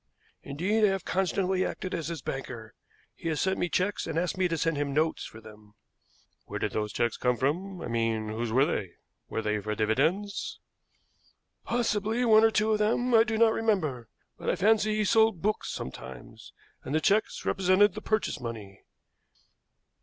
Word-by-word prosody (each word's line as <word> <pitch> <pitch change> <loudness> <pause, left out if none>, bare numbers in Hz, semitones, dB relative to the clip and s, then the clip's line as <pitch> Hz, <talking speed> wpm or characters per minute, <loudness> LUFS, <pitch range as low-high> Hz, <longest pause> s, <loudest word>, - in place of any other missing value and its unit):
Indeed, 190 +10 -1
I - - +7
have 195 -2 -1
constantly 185 0 0
acted 185 - -4
as 165 -4 -3
his 165 -1 -5
banker. 120 -5 -6 0.4
He 165 - -5
has 155 - -1
sent 190 0 0
me 175 - 0
checks 185 +2 -1
and 160 0 -3
asked 175 +1 0
me 185 -1 +2
to 165 -1 -2
send 165 0 0
him 140 -1 -2
notes 160 +1 +1
for 110 - -10
them." 105 -1 -15 0.7
"Where - - -5
did - - -2
those 105 -1 -2
checks 120 +2 0
come 125 -1 +1
from 180 +9 -1
I - - -4
mean 115 -2 -1
whose 110 +1 -3
were 130 +4 +4
they? 95 - -3 0.4
Were 110 - -3
they 105 0 0
for 105 +1 -3
dividends?" 155 - 0 1.1
"Possibly, 225 0 0
one 220 -1 +6
or 225 - +6
two 215 0 +1
of 215 - +2
them, 235 +4 +1
I 225 -1 +7
do 220 -1 -2
not 225 0 +5
remember; 155 - -1 0.3
but - - -3
I - - +2
fancy 215 +1 +3
he 215 -1 +1
sold 220 -2 +3
books 215 +1 0
sometimes, 65 -1 -8 0.3
and 140 - -3
the - - +4
checks 205 +6 +1
represented 190 +1 +3
the - - -7
purchase 215 -1 -1
money." 110 -5 -7
175 Hz, 185 wpm, -28 LUFS, -, 1.1 s, I